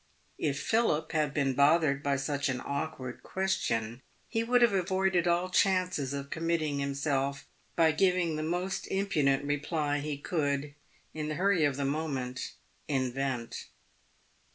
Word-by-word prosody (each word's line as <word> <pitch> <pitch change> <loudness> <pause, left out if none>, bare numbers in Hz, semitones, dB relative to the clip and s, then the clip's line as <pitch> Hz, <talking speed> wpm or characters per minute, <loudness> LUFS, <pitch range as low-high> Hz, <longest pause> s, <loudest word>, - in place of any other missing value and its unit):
If 140 -1 0
Philip 160 -5 +1
had 155 -3 +1
been 140 -2 +1
bothered 140 0 +4
by 140 -1 +1
such 140 +1 -1
an 130 -1 -1
awkward 140 -3 -4
question 120 -12 -1 0.3
he 225 - 0
would 245 +1 +4
have 235 -4 +4
avoided 190 -1 +1
all 175 +1 +2
chances 185 -8 +2
of 140 0 -5
committing 160 -3 0
himself 140 0 -1 0.3
by 165 -2 +5
giving 180 0 +2
the 155 - -2
most 175 +4 -2
impudent 150 -9 +1
reply 145 0 0
he 145 0 -3
could, 145 -2 -1 0.4
in 155 -1 -3
the 155 - -2
hurry 180 -2 +3
of 140 -2 0
the 140 - -1
moment, 135 -4 -3 0.3
invent. 130 -3 -2
150 Hz, 140 wpm, -30 LUFS, 140-175 Hz, 0.4 s, by